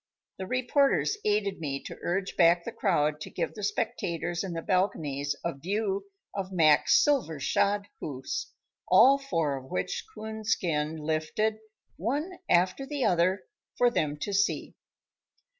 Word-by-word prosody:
The 190 - -4
reporters 270 - +2
aided 205 -3 0
me 140 -4 -3
to - - -8
urge 190 +2 -2
back 170 0 +5
the 235 - -5
crowd 155 -8 +1
to - - -6
give - - -3
the 210 - -8
spectators 175 -4 -2
in 190 -3 -4
the 165 -1 -4
balconies 150 -7 0
a 170 - 0
view 195 +6 -2 0.3
of 195 -1 -4
Mac's 155 -5 +5
silver 260 - +1
shod 200 +8 +1
hoofs, 130 -3 -5 0.4
all 255 +9 +7
four 165 - -1
of 130 0 -11
which - - -2
Coonskin 190 - -2
lifted, 160 +8 -1 0.4
one 290 - -2
after 185 +8 +3
the 285 -3 -1
other, 185 +2 +2 0.3
for 245 -1 +4
them 150 -9 0
to 205 - -3
see. 200 +1 0
185 Hz, 140 wpm, -28 LUFS, 160-215 Hz, 0.4 s, all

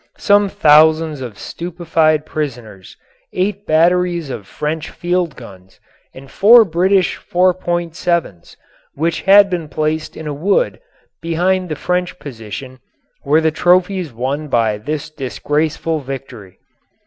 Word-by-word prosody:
Some 205 -1 +3
thousands 155 -4 +4
of 120 -6 -7
stupefied 165 - -1
prisoners, 120 -12 -6 0.4
eight 200 +2 -2
batteries 170 -1 +2
of 105 -6 -7
French 155 +1 -4
field 175 -2 -2
guns, 95 -6 -14 0.3
and 135 0 -14
four 225 +6 +6
British 185 +2 +1
4.7's, 175 - -1 0.4
which 165 +3 -1
had 200 +1 +6
been 175 -5 -4
placed 155 +1 -3
in 160 - -8
a 150 - -3
wood 195 - 0 0.4
behind 180 +2 0
the 155 - -3
French 180 +3 -2
position, 130 - -9 0.4
were 150 +3 +3
the 160 0 +2
trophies 180 0 +1
won 135 +6 -3
by 115 -5 0
this 150 +6 -5
disgraceful 155 +3 -2
victory. 125 -8 -9
160 Hz, 120 wpm, -17 LUFS, 135-180 Hz, 0.4 s, four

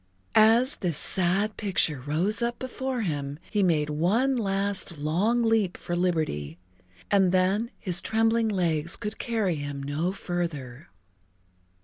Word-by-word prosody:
As 230 +5 +5
this 170 -5 0
sad 195 +4 +1
picture 170 -9 +1
rose 165 - 0
up 235 0 -1
before 260 -1 -3
him 145 -5 -3
he 210 - +1
made 155 -5 +1
one 215 - +1
last 195 -5 -1
long 190 +11 +1
leap 220 -5 +1
for 175 - -4
liberty, 155 - -1 0.5
and 195 -3 +4
then 190 +5 +1
his 180 -2 0
trembling 225 0 +1
legs 170 -4 0
could 210 +1 -6
carry 215 -8 -1
him 145 -1 -5
no 150 +6 -1
further. 165 - -5
185 Hz, 130 wpm, -26 LUFS, 155-220 Hz, 0.5 s, As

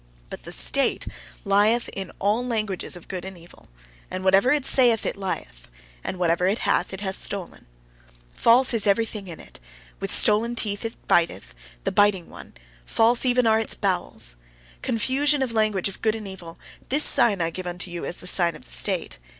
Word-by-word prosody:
But - - -9
the - - -7
state - - +3 0.4
lieth 210 +4 +3
in 195 -2 -6
all 210 +5 0
languages 215 -8 -2
of 175 - -12
good 185 -2 -5
and 190 -1 -8
evil; 170 - -17 0.4
and 185 0 -5
whatever 195 +7 +4
it 290 -2 +1
saith 240 -4 +3
it - - -2
lieth; 185 - -6 0.4
and - - -4
whatever 175 0 +1
it 200 +4 +1
hath - - +1
it 190 0 -7
hath 190 -2 -3
stolen. 195 -4 -5 0.7
False 245 - +4
is 220 -3 +2
everything 210 -1 0
in 170 -3 -7
it; - - -14 0.4
with - - -4
stolen 225 +3 +3
teeth 210 -1 -1
it 225 - -4
biteth, 170 - +1 0.3
the - - -1
biting 205 -4 +2
one. - - -12 0.3
False 230 - +2
are - - +3
even 250 0 +3
its 220 0 +2
bowels. 180 - -3 0.4
Confusion 275 +5 +2
of 255 - -3
language 215 -4 +1
of 195 - -9
good 220 -1 +1
and 215 -2 -7
evil; 175 -3 -9 0.3
this 290 +3 +4
sign 210 -5 +4
I 165 -1 -1
give 185 +2 -6
unto 175 +1 -4
you 175 - -6
as 175 - -4
the - - -11
sign 175 -2 +3
of - - -14
the - - -13
state. - - -1
200 Hz, 190 wpm, -24 LUFS, 180-225 Hz, 0.7 s, whatever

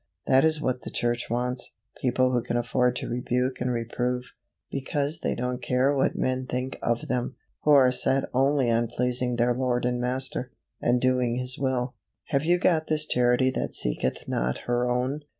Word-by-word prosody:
That 130 0 +4
is 160 -1 +2
what 130 -4 -1
the - - -6
church 120 0 -1
wants 125 +2 -2 0.3
people 130 0 +2
who 125 -1 +1
can 120 +1 -2
afford 125 +1 +1
to - - -3
rebuke 125 +2 -1
and 125 0 0
reprove, 125 +1 -2 0.4
because 145 +3 -2
they - - -1
don't 125 +1 -3
care 130 +3 +2
what 135 - +1
men 130 0 -1
think 125 +1 -3
of 120 0 -1
THEM 125 +1 -2 0.3
who - - -1
are 130 -3 +6
set 135 +1 +1
only 135 -1 +2
on 115 +1 +2
pleasing 125 +1 0
their 120 +1 +2
Lord 125 -1 0
and 125 0 0
Master, 130 0 -2 0.3
and 120 +1 +2
doing 125 -1 +1
His 125 +1 0
will. 130 -2 -1 0.4
Have 140 -1 +1
you 175 +2 +4
got 165 -3 +2
this 155 -1 +1
Charity 125 0 +2
that - - -3
seeketh - - -1
not 60 +1 -1
her 120 0 +1
own? 125 +4 0
125 Hz, 185 wpm, -26 LUFS, 120-130 Hz, 0.4 s, are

